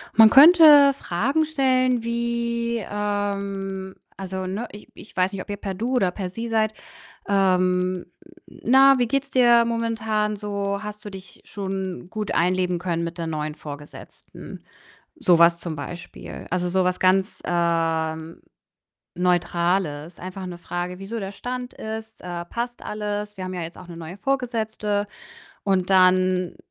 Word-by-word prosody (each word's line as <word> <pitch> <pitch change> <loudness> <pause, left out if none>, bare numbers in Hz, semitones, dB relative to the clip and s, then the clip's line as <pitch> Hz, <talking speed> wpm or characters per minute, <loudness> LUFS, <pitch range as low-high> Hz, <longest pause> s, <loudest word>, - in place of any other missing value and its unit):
Man 220 -1 +9
könnte 295 -1 +8
Fragen 275 - 0
stellen 255 -5 +1
wie, 235 -1 -1
ähm 200 -2 -3 0.2
also, 190 -1 -4
ne, 215 +6 -4
ich 205 - -12
ich - - -14
weiß 185 +1 +2
nicht, 195 - -5
ob - - -12
ihr 205 - -2
per 195 -1 -4
du 230 +7 -3
oder 190 -7 +2
per 185 0 -5
Sie 230 +5 -5
seid. 220 -1 +1 0.5
Ähm, 185 -2 +2 0.4
hm: - - -16
„Na, 270 +3 +6
wie 245 - +2
geht's 275 +3 -1
dir 240 -2 +5
momentan 225 -2 -1
so? 200 0 -3
Hast 210 0 -8
du - - -5
dich 190 -2 -12
schon 190 -2 -5
gut 215 0 -4
einleben 180 0 +1
können 170 -2 -2
mit 170 +1 -6
der 165 - -3
neuen 155 -1 -3
Vorgesetzten?“ 145 -1 -11 0.5
So 180 -9 +4
was 170 0 +5
zum 170 -2 -5
Beispiel. 160 +4 -8
Also 180 -1 -1
so 185 +1 +2
was 180 0 0
ganz, 190 +2 +2
ähm, 165 -1 -1 0.7
Neutrales. 175 -2 0
Einfach 185 +1 -7
'ne 175 -1 -7
Frage, 175 +1 -5
wie 195 - -8
so 230 +1 -4
der 195 0 -4
Stand 250 +4 -5
ist, 220 0 -7
äh: 175 -1 -5
„Passt 240 +4 -5
alles? 210 0 -4
Wir 185 - -5
haben 185 0 -5
ja 175 - -4
jetzt 165 +1 -8
auch 185 - -11
'ne 170 - -9
neue 165 +3 -8
Vorgesetzte“ 220 -5 -1 0.6
und 190 -2 0
dann 185 -1 +3
195 Hz, 155 wpm, -23 LUFS, 180-225 Hz, 0.7 s, Man